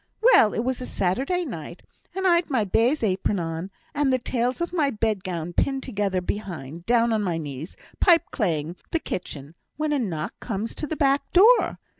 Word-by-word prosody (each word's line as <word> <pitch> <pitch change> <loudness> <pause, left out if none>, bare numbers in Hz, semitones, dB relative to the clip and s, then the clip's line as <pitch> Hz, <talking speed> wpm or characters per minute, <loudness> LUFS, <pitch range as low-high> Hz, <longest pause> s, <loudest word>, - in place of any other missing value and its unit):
Well! 440 - +5
it 225 - 0
was 255 0 -2
a 250 - -4
Saturday 270 - 0
night, 170 - -7 0.3
and 380 0 -2
I'd 345 -2 +3
my 255 -6 +2
baize 230 +8 +2
apron 195 0 0
on, 165 +1 -4 0.2
and 290 -2 +1
the 255 - +3
tails 250 +1 -1
of 345 +1 -3
my 305 -5 +2
bed 215 -5 -1
gown 175 -2 -4
pinned 270 +7 0
together 200 -6 -1
behind, 175 -5 -5
down 235 -1 +3
on 215 - +1
my 180 -5 -1
knees, 150 +1 -7 0.2
pipeclaying 180 - +2
the - - +1
kitchen, 150 - -6 0.2
when 305 0 0
a 290 - +1
knock 185 -4 -3
comes 220 0 -4
to 300 - -4
the 315 - -3
back 275 -1 +1
door. 445 +7 +5
225 Hz, 185 wpm, -25 LUFS, 180-280 Hz, 0.3 s, Well